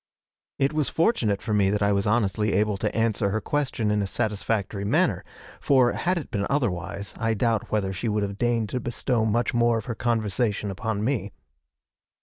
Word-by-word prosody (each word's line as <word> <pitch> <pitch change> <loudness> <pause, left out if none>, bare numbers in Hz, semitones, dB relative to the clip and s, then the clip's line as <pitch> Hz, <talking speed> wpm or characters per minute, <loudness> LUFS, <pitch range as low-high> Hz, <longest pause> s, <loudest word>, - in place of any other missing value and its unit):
It 140 +1 +1
was 150 -4 0
fortunate 120 - +1
for 110 - -2
me 100 -2 +3
that 105 0 0
I 100 - +3
was 100 +1 +1
honestly 105 -1 +1
able 105 +1 +2
to 105 +2 -2
answer 115 -2 +1
her 110 +3 0
question 130 -6 -1
in 105 0 +1
a 100 - -1
satisfactory 105 -1 -1
manner, 100 - +1 0.4
for, 130 -3 +4
had 180 +1 0
it 160 - -6
been 100 -1 -1
otherwise, 100 -6 -2
I 115 0 +1
doubt 115 0 0
whether 100 -3 0
she 110 +5 -2
would 105 -1 0
have 100 0 -4
deigned 120 -3 +1
to 125 - -2
bestow 120 -1 -1
much 115 +2 +1
more 120 -1 +3
of 110 - -5
her 120 - -3
conversation 110 -2 -1
upon 105 +1 -3
me. 110 -6 -1
110 Hz, 190 wpm, -25 LUFS, 100-120 Hz, 0.4 s, for